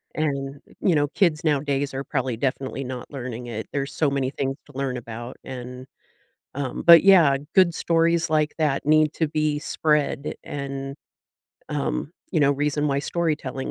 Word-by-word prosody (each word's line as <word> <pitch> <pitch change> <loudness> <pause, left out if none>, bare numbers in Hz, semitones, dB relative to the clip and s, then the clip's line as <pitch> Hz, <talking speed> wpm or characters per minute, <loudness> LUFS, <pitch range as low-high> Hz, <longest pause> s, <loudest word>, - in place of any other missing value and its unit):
and, 140 -2 -2 0.2
you 175 -5 +2
know, 145 0 +2
kids 165 -4 +1
nowadays 145 -2 0
are 135 +1 -4
probably 130 -4 -2
definitely 135 +1 -2
not 125 +1 -7
learning 125 -3 -6
it, 110 -1 -5
there's 140 0 -2
so 150 -3 +1
many 135 -2 -1
things 135 -1 -2
to 140 -2 -13
learn 135 -2 -1
about, 120 +1 -7
and, 125 0 -8 0.7
um 135 -3 -3
but, 170 0 +9
yeah, 170 -8 +7 0.2
good 185 -3 +5
stories 165 0 +1
like 155 -1 +1
that 150 -4 +1
need 155 0 +4
to 160 -2 0
be 155 -1 0
spread 150 -3 0
and, 140 0 -5 0.7
um, 150 +1 -2 0.2
you 160 - +2
know, 140 0 +5
reason 145 +1 0
why 140 0 +1
storytelling 150 -4 -2
140 Hz, 160 wpm, -24 LUFS, 135-155 Hz, 0.7 s, but